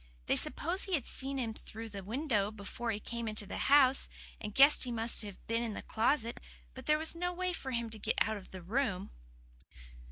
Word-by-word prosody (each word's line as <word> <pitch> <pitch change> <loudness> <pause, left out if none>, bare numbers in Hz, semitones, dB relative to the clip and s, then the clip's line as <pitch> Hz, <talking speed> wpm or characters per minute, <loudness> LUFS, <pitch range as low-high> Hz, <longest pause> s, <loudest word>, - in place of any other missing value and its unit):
They - - +2
supposed 350 +5 +3
he 380 -2 +1
had 275 - -2
seen 275 +1 -2
him 235 -4 -2
through 225 +1 -8
the 200 -2 -7
window 220 -2 -1
before 215 +3 -6
he 210 -2 -1
came 235 +1 -5
into 215 -1 -1
the - - -6
house, 275 -2 +6 0.3
and 210 - -6
guessed 280 +2 +7
he 250 - -3
must 230 0 +2
be 210 +2 -6
in 230 -1 -1
the - - -6
closet 230 +1 +1 0.3
because - - -11
there 305 - +4
was 315 +1 -1
no 355 +1 -1
way 365 0 -2
for 270 - -5
him 235 -3 -3
to 220 - -6
get 220 - 0
out 220 0 +1
of 195 - -12
the 185 -2 -10
room." 210 -1 -2
235 Hz, 215 wpm, -32 LUFS, 215-275 Hz, 0.3 s, guessed